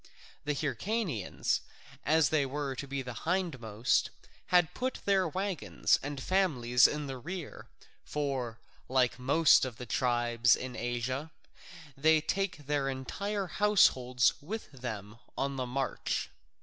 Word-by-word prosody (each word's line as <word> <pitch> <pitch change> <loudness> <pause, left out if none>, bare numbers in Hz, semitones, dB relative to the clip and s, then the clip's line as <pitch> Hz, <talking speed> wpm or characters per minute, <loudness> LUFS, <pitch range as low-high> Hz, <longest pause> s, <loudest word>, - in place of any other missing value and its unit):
The 150 0 0
Hyrcanians, 150 - -1 0.5
as 155 -2 +4
they 155 -2 +2
were 140 0 -3
to 140 - -6
be 140 -1 -3
the 125 -1 -6
hindmost, 130 - 0 0.4
had 180 -1 +3
put 255 0 -2
their 195 -2 +3
waggons 165 - 0
and 145 0 -5
families 130 -9 +3
in 150 0 -3
the 135 -2 -6
rear, 175 +4 -7 0.4
for, 135 -6 -3 0.3
like 130 -1 +2
most 145 +5 +5
of 125 -4 -4
the 125 - -7
tribes 120 -2 +2
in 125 -1 -6
Asia, 125 +5 -2 0.7
they 155 +3 +4
take 175 -1 -2
their 140 -1 0
entire 195 +10 -3
households 130 -12 +3
with 210 +7 -6
them 115 -5 -7 0.2
on 140 0 -1
the 130 -1 -2
march. 135 +2 -2
140 Hz, 130 wpm, -31 LUFS, 125-165 Hz, 0.7 s, most